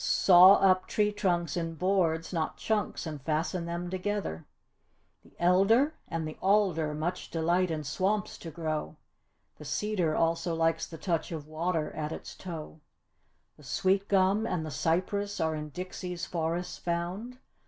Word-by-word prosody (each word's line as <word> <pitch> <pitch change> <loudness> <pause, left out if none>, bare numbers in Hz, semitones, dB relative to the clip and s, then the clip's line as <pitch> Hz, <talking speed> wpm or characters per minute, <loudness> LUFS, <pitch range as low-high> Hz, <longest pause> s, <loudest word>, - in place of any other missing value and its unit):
Saw 185 +1 +7
up 185 -2 +3
tree 210 -1 +1
trunks 175 -6 0
in 165 -1 -3
boards, 170 -1 +1
not 160 -2 -2
chunks, 215 -4 -1
and 150 -3 -6
fasten 165 +4 -1
them 170 +1 -4
together. 190 - -3 0.7
The - - -22
elder 195 - +4
and 165 -2 -3
the 155 - -8
alder 185 -7 +2
much 175 +4 -3
delight 170 +3 +1
in 155 -2 -2
swamps 190 +8 -1
to 165 - -7
grow. 155 -2 -3 0.6
The - - -9
cedar 190 -7 0
also 165 +1 +1
likes 165 0 +1
the 165 - -9
touch 165 -1 -2
of 155 -3 -5
water 160 +1 -2
at 155 0 -4
its - - -7
toe. 160 -3 -8 0.8
The 150 - -17
sweet 195 +7 +1
gum 195 +3 +3
and 165 -7 -2
the 155 - -5
cypress 200 +7 -1
are 160 0 +1
in 150 -1 -5
Dixie's 180 +1 -5
forests 170 +1 -3
found. 180 +8 -3
175 Hz, 155 wpm, -29 LUFS, 160-190 Hz, 0.8 s, Saw